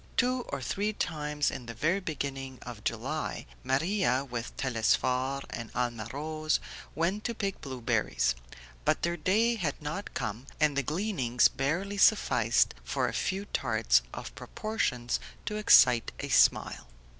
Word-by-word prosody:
Two 250 Hz, +1 st, +2 dB
or -, -, -4 dB
three 210 Hz, +2 st, -1 dB
times 150 Hz, -5 st, -1 dB
in 125 Hz, -, -7 dB
the 115 Hz, -, -6 dB
very 170 Hz, -, +1 dB
beginning 135 Hz, -6 st, -4 dB
of 115 Hz, -4 st, -9 dB
July -, -, -3 dB, 0.2 s
Maria, 140 Hz, -2 st, +1 dB
with 120 Hz, -2 st, -6 dB
Telesphore 130 Hz, +2 st, +1 dB
and 115 Hz, -, -5 dB
Alma 120 Hz, -3 st, -1 dB
Rose, 155 Hz, +2 st, -1 dB, 0.4 s
went 185 Hz, +6 st, 0 dB
to 235 Hz, -, -1 dB
pick 200 Hz, -3 st, -3 dB
blueberries; 115 Hz, -, 0 dB, 0.5 s
but -, -, +1 dB
their 170 Hz, 0 st, +1 dB
day 210 Hz, +8 st, +2 dB
had 160 Hz, -8 st, -2 dB
not 155 Hz, +7 st, -5 dB
come, 110 Hz, +6 st, -4 dB
and 150 Hz, -2 st, +3 dB
the 140 Hz, -, +2 dB
gleanings 150 Hz, -, +2 dB
barely 175 Hz, +9 st, -2 dB
sufficed -, -, +4 dB
for -, -, 0 dB
a -, -, -3 dB
few 195 Hz, +1 st, -1 dB
tarts 110 Hz, -, +2 dB
of -, -, -7 dB
proportions 125 Hz, -, -2 dB, 0.3 s
to 210 Hz, -, -2 dB
excite 125 Hz, -, +6 dB
a -, -, -4 dB
smile. -, -, +3 dB
145 Hz, 145 wpm, -30 LUFS, 125-190 Hz, 0.5 s, excite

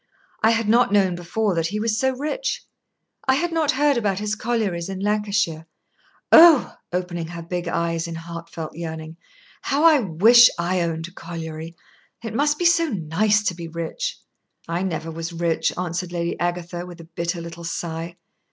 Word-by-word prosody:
I 220 Hz, -, +5 dB
had 225 Hz, -1 st, +1 dB
not 235 Hz, 0 st, +4 dB
known 195 Hz, -3 st, +3 dB
before 185 Hz, +4 st, -1 dB
that 165 Hz, -1 st, 0 dB
he 210 Hz, +5 st, -3 dB
was 220 Hz, 0 st, 0 dB
so 265 Hz, +2 st, +1 dB
rich. 305 Hz, -, -3 dB, 0.6 s
I 265 Hz, -, +5 dB
had 340 Hz, +5 st, -1 dB
not 320 Hz, -3 st, 0 dB
heard 285 Hz, 0 st, +2 dB
about 205 Hz, -5 st, 0 dB
his 210 Hz, +1 st, -2 dB
collieries 215 Hz, -6 st, -1 dB
in 190 Hz, -1 st, -5 dB
Lancashire. 200 Hz, -5 st, 0 dB, 0.6 s
Oh!" 325 Hz, -5 st, +8 dB, 0.2 s
opening 175 Hz, -2 st, -3 dB
her 170 Hz, 0 st, -7 dB
big 175 Hz, +1 st, -4 dB
eyes 170 Hz, 0 st, -1 dB
in 165 Hz, -, -6 dB
heart 170 Hz, 0 st, -8 dB
felt 160 Hz, -2 st, -6 dB
yearning, 160 Hz, -1 st, -6 dB, 0.4 s
"how 280 Hz, +3 st, 0 dB
I 320 Hz, -3 st, +7 dB
wish 225 Hz, +5 st, +6 dB
I 175 Hz, +1 st, 0 dB
owned 165 Hz, -1 st, -2 dB
a -, -, -14 dB
colliery! 165 Hz, -1 st, -7 dB, 0.5 s
It 225 Hz, -1 st, -5 dB
must 295 Hz, +5 st, +2 dB
be 350 Hz, -, -1 dB
so 340 Hz, -1 st, +5 dB
nice 205 Hz, -, +1 dB
to 185 Hz, -, 0 dB
be 170 Hz, -1 st, -7 dB
rich!" 170 Hz, -, -4 dB, 0.5 s
"I 170 Hz, +2 st, -2 dB
never 165 Hz, -4 st, -3 dB
was 165 Hz, +1 st, -5 dB
rich," 170 Hz, -1 st, 0 dB
answered 180 Hz, 0 st, -3 dB
Lady 170 Hz, -1 st, -2 dB
Agatha, 175 Hz, 0 st, -3 dB
with 175 Hz, -1 st, -10 dB
a -, -, -9 dB
bitter 170 Hz, +1 st, -4 dB
little 170 Hz, 0 st, -8 dB
sigh. 165 Hz, 0 st, -4 dB
175 Hz, 180 wpm, -23 LUFS, 170-220 Hz, 0.6 s, Oh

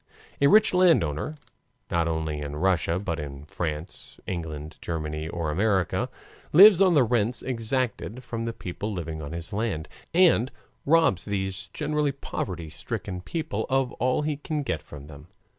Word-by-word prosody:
A 140 Hz, -, +6 dB
rich 215 Hz, +7 st, +6 dB
landowner 155 Hz, -, +3 dB, 0.6 s
not 85 Hz, -1 st, +2 dB
only 80 Hz, -2 st, -2 dB
in 75 Hz, 0 st, -5 dB
Russia, 85 Hz, 0 st, +1 dB
but 90 Hz, -4 st, -3 dB
in 70 Hz, -1 st, -7 dB
France, 75 Hz, +1 st, -5 dB
England, 80 Hz, -4 st, -5 dB
Germany, 75 Hz, -1 st, -3 dB
or 85 Hz, -3 st, -2 dB
America 95 Hz, 0 st, +1 dB, 0.4 s
lives 195 Hz, +3 st, +9 dB
on 185 Hz, -3 st, +5 dB
the 140 Hz, -, +6 dB
rents 120 Hz, 0 st, 0 dB
exacted; 125 Hz, 0 st, -2 dB
from 115 Hz, -2 st, -4 dB
the 115 Hz, -, -1 dB
people 105 Hz, 0 st, -5 dB
living 80 Hz, -4 st, -4 dB
on 70 Hz, 0 st, -6 dB
his 85 Hz, +1 st, -5 dB
land, 100 Hz, -7 st, -2 dB, 0.2 s
and 165 Hz, -9 st, +5 dB, 0.4 s
robs 160 Hz, -, +4 dB
these 95 Hz, -1 st, -3 dB
generally 150 Hz, +5 st, -1 dB
poverty 90 Hz, -, -5 dB
stricken 90 Hz, +3 st, -5 dB
people 130 Hz, -, -3 dB
of 135 Hz, -1 st, +1 dB
all 130 Hz, +4 st, +2 dB
he 150 Hz, -1 st, -1 dB
can 150 Hz, +1 st, -3 dB
get 85 Hz, -, -2 dB
from 70 Hz, -1 st, -11 dB
them. 75 Hz, +1 st, -12 dB
95 Hz, 155 wpm, -26 LUFS, 80-135 Hz, 0.6 s, lives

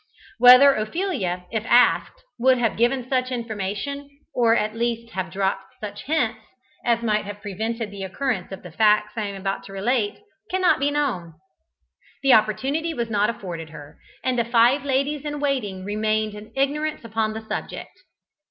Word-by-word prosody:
Whether 250 Hz, +3 st, +9 dB
Ophelia, 215 Hz, -, -2 dB
if 220 Hz, -2 st, -1 dB
asked, 245 Hz, +1 st, +3 dB, 0.2 s
would 260 Hz, +1 st, +4 dB
have 230 Hz, -3 st, 0 dB
given 240 Hz, +2 st, +1 dB
such 255 Hz, -1 st, 0 dB
information, 235 Hz, +4 st, -4 dB, 0.2 s
or 230 Hz, -2 st, +4 dB
at 215 Hz, -1 st, 0 dB
least 230 Hz, 0 st, -2 dB
have 185 Hz, -2 st, -3 dB
dropped 195 Hz, 0 st, -2 dB
such 205 Hz, -1 st, -7 dB
hints, 240 Hz, -7 st, 0 dB, 0.4 s
as 235 Hz, -1 st, +1 dB
might 215 Hz, -2 st, +1 dB
have 205 Hz, 0 st, -7 dB
prevented 220 Hz, +2 st, -3 dB
the 200 Hz, -1 st, -8 dB
occurrence 195 Hz, +1 st, -2 dB
of 190 Hz, -, -8 dB
the 180 Hz, -, -10 dB
facts 210 Hz, +2 st, +3 dB
I 220 Hz, -2 st, -2 dB
am 200 Hz, -, -6 dB
about 195 Hz, 0 st, -3 dB
to 195 Hz, -, -11 dB
relate, 205 Hz, +2 st, 0 dB, 0.3 s
cannot 370 Hz, -1 st, +3 dB
now 280 Hz, -, 0 dB
be -, -, +3 dB
known. 250 Hz, -, -2 dB, 0.9 s
The 270 Hz, -2 st, +6 dB
opportunity 270 Hz, -, +1 dB
was 235 Hz, -3 st, -3 dB
not 210 Hz, 0 st, +2 dB
afforded 175 Hz, -8 st, -6 dB
her, 145 Hz, -2 st, -12 dB, 0.2 s
and 255 Hz, -2 st, 0 dB
the -, -, +3 dB
five 240 Hz, +4 st, +4 dB
ladies 280 Hz, +1 st, 0 dB
in 295 Hz, -1 st, -4 dB
waiting 225 Hz, -10 st, -2 dB
remained 215 Hz, +1 st, 0 dB
in 210 Hz, +1 st, -11 dB
ignorance 295 Hz, +2 st, -1 dB
upon 220 Hz, -1 st, -1 dB
the 220 Hz, -, -5 dB
subject. -, -, -5 dB
225 Hz, 170 wpm, -23 LUFS, 205-260 Hz, 0.9 s, Whether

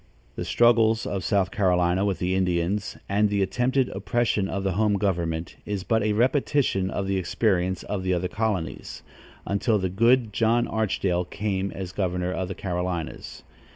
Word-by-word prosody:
The -, -, -4 dB
struggles 115 Hz, -2 st, +3 dB
of 95 Hz, -2 st, -3 dB
South 100 Hz, -3 st, +1 dB
Carolinia 90 Hz, -2 st, +2 dB
with 100 Hz, -2 st, 0 dB
the 90 Hz, +1 st, -1 dB
Indians, 90 Hz, +1 st, 0 dB
and 105 Hz, +1 st, +2 dB
the 100 Hz, -1 st, +1 dB
attempted 125 Hz, +7 st, +1 dB
oppression 115 Hz, -5 st, 0 dB
of 95 Hz, +1 st, -3 dB
the 95 Hz, -, 0 dB
home 105 Hz, +2 st, +2 dB
government 85 Hz, -4 st, -2 dB
is 100 Hz, -3 st, -4 dB
but 110 Hz, +5 st, +1 dB
a 105 Hz, 0 st, +1 dB
repetition 125 Hz, -4 st, +1 dB
of 100 Hz, -, -2 dB
the 95 Hz, 0 st, 0 dB
experience 95 Hz, -1 st, 0 dB
of 105 Hz, -2 st, -3 dB
the 95 Hz, 0 st, -1 dB
other 90 Hz, +1 st, -1 dB
colonies, 100 Hz, -3 st, -3 dB, 0.4 s
until 105 Hz, +3 st, +1 dB
the 95 Hz, -2 st, -1 dB
good 115 Hz, +3 st, +3 dB
John 115 Hz, +3 st, +2 dB
Archdale 95 Hz, -5 st, 0 dB
came 100 Hz, 0 st, -2 dB
as 95 Hz, -2 st, -6 dB
governor 90 Hz, -2 st, -1 dB
of 95 Hz, 0 st, -2 dB
the 95 Hz, -, -5 dB
Carolinias. 90 Hz, -3 st, -4 dB
95 Hz, 165 wpm, -25 LUFS, 90-110 Hz, 0.4 s, struggles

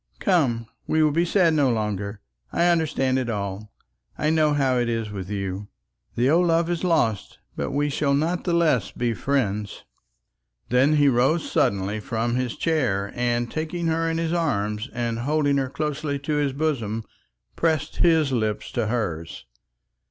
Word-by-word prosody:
"Come, 135 Hz, -12 st, +1 dB, 0.2 s
we 155 Hz, 0 st, +3 dB
will 155 Hz, -, +3 dB
be 170 Hz, +4 st, +2 dB
sad 175 Hz, -2 st, +3 dB
no 145 Hz, -4 st, +3 dB
longer. 105 Hz, -3 st, -2 dB, 0.3 s
I 170 Hz, -, +2 dB
understand 150 Hz, -6 st, +1 dB
it 125 Hz, -2 st, -3 dB
all. 100 Hz, -1 st, -4 dB, 0.5 s
I 150 Hz, -, +1 dB
know 155 Hz, -2 st, +3 dB
how 130 Hz, -3 st, +2 dB
it 120 Hz, -1 st, 0 dB
is 115 Hz, -2 st, -2 dB
with 95 Hz, -2 st, -6 dB
you. 100 Hz, 0 st, -4 dB, 0.5 s
The 120 Hz, +2 st, +2 dB
old 170 Hz, +5 st, +4 dB
love 165 Hz, +1 st, +2 dB
is 175 Hz, 0 st, -2 dB
lost, 120 Hz, -, 0 dB, 0.2 s
but -, -, -2 dB
we 145 Hz, +1 st, 0 dB
will 140 Hz, -2 st, +3 dB
not 165 Hz, +5 st, 0 dB
the 175 Hz, -, 0 dB
less 155 Hz, -, +2 dB
be 120 Hz, -1 st, -1 dB
friends." 105 Hz, -6 st, -2 dB, 0.9 s
Then 130 Hz, +5 st, +4 dB
he 145 Hz, -1 st, +4 dB
rose 135 Hz, +6 st, +2 dB
suddenly 100 Hz, +2 st, +1 dB
from 115 Hz, 0 st, -2 dB
his 125 Hz, -1 st, -1 dB
chair, 115 Hz, -12 st, 0 dB
and 120 Hz, -1 st, -1 dB
taking 160 Hz, +2 st, -3 dB
her 165 Hz, 0 st, 0 dB
in 165 Hz, -, -1 dB
his 165 Hz, 0 st, -1 dB
arms, 105 Hz, -8 st, -1 dB
and 120 Hz, -1 st, -2 dB
holding 145 Hz, +2 st, +1 dB
her 135 Hz, -1 st, 0 dB
closely 150 Hz, 0 st, -2 dB
to 140 Hz, +2 st, -3 dB
his 145 Hz, -2 st, +1 dB
bosom, 120 Hz, -8 st, -1 dB, 0.5 s
pressed 160 Hz, -2 st, 0 dB
his 160 Hz, -4 st, +3 dB
lips 110 Hz, -3 st, -1 dB
to 120 Hz, -3 st, -1 dB
hers. 85 Hz, -, -3 dB
135 Hz, 165 wpm, -24 LUFS, 110-155 Hz, 0.9 s, old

